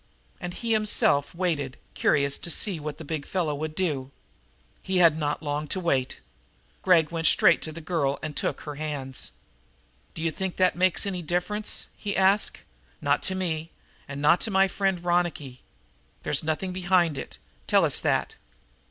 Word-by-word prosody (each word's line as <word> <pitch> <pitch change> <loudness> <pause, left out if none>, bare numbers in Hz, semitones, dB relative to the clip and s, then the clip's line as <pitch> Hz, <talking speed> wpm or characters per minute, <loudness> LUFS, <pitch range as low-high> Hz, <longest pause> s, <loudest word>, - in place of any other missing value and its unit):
And 175 0 -6
he 230 -1 -3
himself 210 -9 +2
waited, 155 -7 -1 0.2
curious 140 -1 +2
to - - -4
see 180 0 +1
what 150 -1 -5
the 160 - -9
big 155 -1 -3
fellow 170 -5 0
would 155 +2 -4
do. 145 -8 -1 0.7
He 190 -1 -1
had 170 -3 +6
not 150 0 -2
long 150 0 -2
to 190 - -1
wait. 135 -7 -1 0.6
Gregg 170 -5 +4
went 165 -1 +1
straight 170 - +5
to 160 - -5
the 165 +2 -8
girl 145 -5 0
and 155 -2 -4
took - - -2
her 150 -2 -7
hands. 145 -4 -3 0.9
"D'you 165 0 -1
think 190 +3 -3
that 185 -1 +3
makes 185 +2 +2
any 185 -3 -3
difference?" 180 +6 -2
he 200 -2 -3
asked. 195 +2 +2 0.4
"Not - - +1
to 190 - -1
me, 165 -3 -2 0.4
and 140 0 -6
not 170 +4 +5
to - - -1
my 195 -1 +4
friend 190 -2 -1
Ronicky. 175 -7 -1 0.6
There's - - +1
something 160 +4 -2
behind 175 -3 +2
it. 135 - -7 0.3
Tell - - +4
us - - +1
that!" - - 0
165 Hz, 170 wpm, -26 LUFS, 150-185 Hz, 0.9 s, had